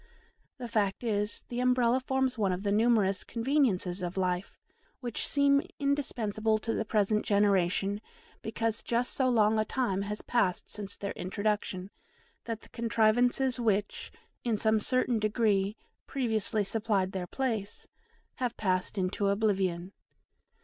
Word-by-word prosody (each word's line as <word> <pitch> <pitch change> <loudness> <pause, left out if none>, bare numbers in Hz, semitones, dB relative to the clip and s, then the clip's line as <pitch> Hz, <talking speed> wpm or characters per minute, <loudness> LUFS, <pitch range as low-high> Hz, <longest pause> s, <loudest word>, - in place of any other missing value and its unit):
The 250 -2 -5
fact 210 -2 0
is, 210 -2 -1
the 240 - -3
Umbrella 250 0 +3
forms 265 0 0
one 205 -5 +1
of 180 +2 -3
the 200 - 0
numerous 210 -3 +3
conveniences 230 -8 0
of 180 +1 -4
life 180 0 -1 0.4
which 240 -3 -3
seem 280 -1 +4 0.2
indispensable 225 -7 0
to 225 +1 -3
the - - 0
present 215 0 +1
generation, 200 -1 +2 0.4
because 225 0 -2
just 240 +1 -1
so 260 -2 +2
long 220 -2 +3
a - - +3
time 215 -5 -1
has 210 +1 -4
passed 190 -7 0
since 205 -2 -6
their 200 - -4
introduction, 200 0 -2 0.5
that 230 -2 -4
the - - -17
contrivances 240 +3 +2
which, 210 -3 -1 0.3
in 230 -3 +1
some 220 +1 +3
certain 250 +1 +1
degree, 210 -2 +1 0.3
previously 220 -4 0
supplied 205 -2 0
their 185 -2 -4
place, 220 -4 -3 0.5
have 245 -2 -2
passed 185 -1 0
into 190 +2 0
oblivion. 195 -3 0
215 Hz, 135 wpm, -30 LUFS, 200-240 Hz, 0.5 s, seem